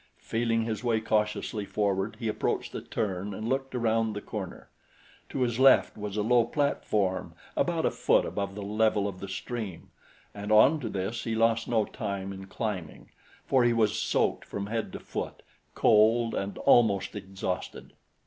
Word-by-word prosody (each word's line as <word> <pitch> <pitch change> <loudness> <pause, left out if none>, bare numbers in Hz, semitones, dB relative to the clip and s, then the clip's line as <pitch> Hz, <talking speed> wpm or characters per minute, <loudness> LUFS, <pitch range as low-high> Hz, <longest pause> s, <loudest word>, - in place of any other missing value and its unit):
Feeling 115 0 0
his 110 0 -3
way 115 -2 +2
cautiously 105 -1 -1
forward 100 +1 -1
he 115 - -3
approached 110 - -1
the - - -5
turn 100 -1 -3
and 110 +2 -4
looked 135 +1 -1
around 115 -2 +1
the 105 - -4
corner. 95 -5 -7 0.6
To 135 - -3
his 120 -1 0
left 135 0 +6
was 105 -1 -5
a 105 - +1
low 120 +2 +4
platform 110 -8 -1 0.2
about - - +1
a - - +2
foot - - +2
above 100 -1 -3
the 105 - -5
level 105 0 +1
of 95 -2 -6
the 100 - -6
stream, 100 -1 -5 0.4
and 105 +1 -5
onto 120 +4 +5
this 100 +4 -3
he 115 -1 -1
lost 115 0 +2
no 110 -3 +2
time 100 -1 -4
in 95 0 -9
climbing, 100 -7 -5 0.3
for 130 -2 +3
he 120 0 +4
was 110 -2 +2
soaked - - 0
from 100 0 -5
head 110 +1 -3
to - - -5
foot, - - -6 0.3
cold 115 +2 +4
and 100 0 -3
almost 110 -8 +3
exhausted. 95 -2 -5
110 Hz, 170 wpm, -28 LUFS, 100-115 Hz, 0.6 s, left